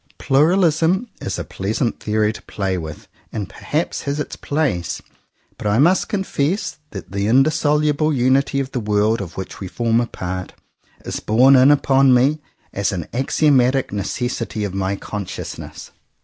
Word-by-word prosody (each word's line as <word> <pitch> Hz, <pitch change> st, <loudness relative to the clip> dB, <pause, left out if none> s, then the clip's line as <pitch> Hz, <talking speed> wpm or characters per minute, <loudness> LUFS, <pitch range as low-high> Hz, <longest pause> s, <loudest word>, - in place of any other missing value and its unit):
Pluralism 165 Hz, -, +2 dB
is -, -, -3 dB
a -, -, -3 dB
pleasant 110 Hz, +5 st, -2 dB
theory 105 Hz, 0 st, 0 dB
to -, -, -10 dB
play 95 Hz, -2 st, -3 dB
with, 80 Hz, -4 st, -7 dB, 0.2 s
and 105 Hz, -3 st, -4 dB
perhaps 155 Hz, +3 st, -3 dB
has 140 Hz, +1 st, -3 dB
its 150 Hz, -, -4 dB
place, 135 Hz, -, -1 dB, 0.6 s
but -, -, -3 dB
I 105 Hz, +1 st, +2 dB
must 170 Hz, +8 st, +3 dB
confess 190 Hz, -3 st, -1 dB
that 95 Hz, -, -9 dB
the 100 Hz, +1 st, -1 dB
indissoluble 150 Hz, +3 st, +2 dB
unity 135 Hz, +1 st, +2 dB
of 135 Hz, -1 st, -3 dB
the 125 Hz, -, -2 dB
world 105 Hz, 0 st, +1 dB
of 85 Hz, -3 st, -8 dB
which 95 Hz, -2 st, -6 dB
we 95 Hz, -, -5 dB
form 115 Hz, +4 st, +1 dB
a 120 Hz, -, -2 dB
part 90 Hz, -3 st, -5 dB, 0.5 s
is -, -, -3 dB
borne 125 Hz, +6 st, +5 dB
in 130 Hz, +1 st, +6 dB
upon 135 Hz, -2 st, +4 dB
me 140 Hz, +5 st, +3 dB, 0.3 s
as 100 Hz, 0 st, 0 dB
an 90 Hz, -5 st, -3 dB
axiomatic 135 Hz, -1 st, +2 dB
necessity 110 Hz, +2 st, -3 dB
of 100 Hz, -2 st, -3 dB
my 95 Hz, 0 st, -1 dB
consciousness. 100 Hz, -1 st, -7 dB
125 Hz, 155 wpm, -20 LUFS, 105-145 Hz, 0.6 s, in